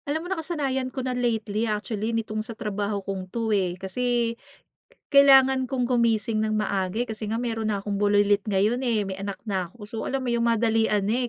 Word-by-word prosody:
Alam 315 Hz, +3 st, -1 dB
mo -, -, -5 dB
nakasanayan 290 Hz, -7 st, -2 dB
ko 260 Hz, 0 st, -5 dB
na 255 Hz, -, -1 dB
lately 225 Hz, -3 st, -1 dB
actually 210 Hz, +1 st, -2 dB
nitong 225 Hz, -2 st, -2 dB
sa 220 Hz, +1 st, -8 dB
trabaho 205 Hz, -2 st, -3 dB
kong 190 Hz, -1 st, -5 dB
'to, 225 Hz, +1 st, -1 dB
eh, 185 Hz, -3 st, 0 dB
kasi 235 Hz, +4 st, -1 dB, 0.8 s
kailangan 265 Hz, -2 st, +6 dB
kong 255 Hz, -1 st, -1 dB
gumising 230 Hz, -3 st, +1 dB
ng 215 Hz, 0 st, 0 dB
maaga 200 Hz, +1 st, -1 dB
kasi 220 Hz, -2 st, -5 dB
nga 220 Hz, -, -1 dB
mayro'n 225 Hz, -2 st, -2 dB
na 200 Hz, -2 st, -2 dB
akong 200 Hz, -1 st, -2 dB
bulilit 205 Hz, 0 st, +3 dB
ngayon, 210 Hz, +5 st, +2 dB
eh, 230 Hz, -5 st, +1 dB
may 190 Hz, 0 st, -6 dB
anak 200 Hz, -1 st, -4 dB
na 190 Hz, -5 st, -2 dB
ako, 210 Hz, -, -23 dB
so 210 Hz, +2 st, -9 dB
alam 270 Hz, -1 st, -2 dB
mo 245 Hz, -, 0 dB
yung 235 Hz, 0 st, +1 dB
madalian 225 Hz, -2 st, +2 dB
na, 240 Hz, +4 st, 0 dB
220 Hz, 195 wpm, -25 LUFS, 205-245 Hz, 0.8 s, kailangan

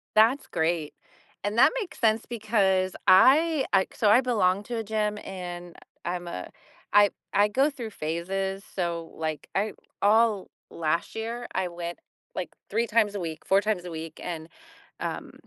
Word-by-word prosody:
That's 230 Hz, +6 st, +5 dB
great, 160 Hz, -2 st, -1 dB, 0.5 s
and 205 Hz, +3 st, -2 dB
that 245 Hz, -, +7 dB
makes 395 Hz, -, -7 dB
sense 225 Hz, -2 st, +2 dB
because 200 Hz, -5 st, +1 dB
I 280 Hz, -, +6 dB
uh 190 Hz, -1 st, +5 dB
so 210 Hz, -, +2 dB
I 230 Hz, +5 st, +7 dB
belong 200 Hz, -6 st, +2 dB
to 240 Hz, -, -4 dB
a 225 Hz, -, -2 dB
gym, 210 Hz, 0 st, -1 dB
and 175 Hz, -2 st, -7 dB, 0.3 s
I'm 175 Hz, 0 st, -3 dB
a 90 Hz, -, -6 dB, 0.4 s
I 205 Hz, -1 st, +6 dB, 0.2 s
I 205 Hz, +1 st, +4 dB
go 265 Hz, +7 st, +3 dB
through 245 Hz, -7 st, -6 dB
phases, 190 Hz, +4 st, -3 dB
so, 170 Hz, -2 st, -2 dB
like, 155 Hz, -2 st, -4 dB
I 210 Hz, +2 st, 0 dB, 0.3 s
all 215 Hz, -1 st, +3 dB, 0.2 s
last 165 Hz, +3 st, -1 dB
year 230 Hz, +2 st, -4 dB
I 190 Hz, -, +1 dB
went, 170 Hz, 0 st, -6 dB, 0.4 s
like, -, -, -3 dB, 0.2 s
3 235 Hz, -, +1 dB
times 210 Hz, -2 st, +2 dB
a -, -, -3 dB
week, 160 Hz, -3 st, -5 dB
4 195 Hz, +1 st, +4 dB
times 210 Hz, -4 st, -1 dB
a 180 Hz, -, -6 dB
week, 160 Hz, -1 st, -7 dB
and, 160 Hz, -2 st, -5 dB, 0.5 s
um, -, -, -4 dB
195 Hz, 165 wpm, -27 LUFS, 175-225 Hz, 0.5 s, that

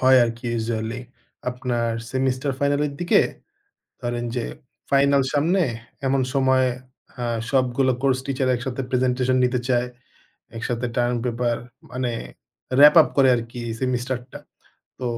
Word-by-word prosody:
হয় 130 Hz, 0 st, +6 dB
আরকি, 115 Hz, +1 st, -5 dB
ইউজুয়ালি। 115 Hz, +1 st, -2 dB, 0.5 s
আপনার 120 Hz, -2 st, -1 dB, 0.2 s
সেমিস্টার 130 Hz, +1 st, 0 dB
ফাইনালের 145 Hz, 0 st, +1 dB
দিকে, 175 Hz, -, +4 dB, 0.8 s
ধরেন 120 Hz, 0 st, -2 dB
যে 120 Hz, -, -1 dB, 0.5 s
ফাইনাল 140 Hz, 0 st, +4 dB
সামনে, 165 Hz, +6 st, +2 dB, 0.5 s
এমন 135 Hz, 0 st, +2 dB
সময় 130 Hz, -1 st, +3 dB, 0.5 s
আ -, -, -2 dB, 0.3 s
সবগুলা 130 Hz, 0 st, +2 dB
কোর্স 135 Hz, -2 st, +2 dB
টিচার 135 Hz, -1 st, -1 dB
একসাথে 130 Hz, +1 st, -4 dB
প্রেজেন্টেশন 130 Hz, 0 st, +1 dB
নিতে 125 Hz, 0 st, 0 dB
চায়। 125 Hz, -1 st, +2 dB, 0.7 s
একসাথে 120 Hz, +1 st, -2 dB
টার্ম 120 Hz, 0 st, +1 dB
পেপার 120 Hz, -1 st, 0 dB, 0.3 s
মানে 125 Hz, -1 st, -2 dB, 0.7 s
র‍্যাপ-আপ 150 Hz, +3 st, +8 dB
করে 135 Hz, -1 st, +6 dB
আরকি 115 Hz, +1 st, -5 dB, 0.2 s
সেমিস্টারটা। 125 Hz, 0 st, -2 dB, 0.6 s
তো 130 Hz, -, -6 dB
130 Hz, 120 wpm, -23 LUFS, 120-135 Hz, 0.8 s, র‍্যাপ-আপ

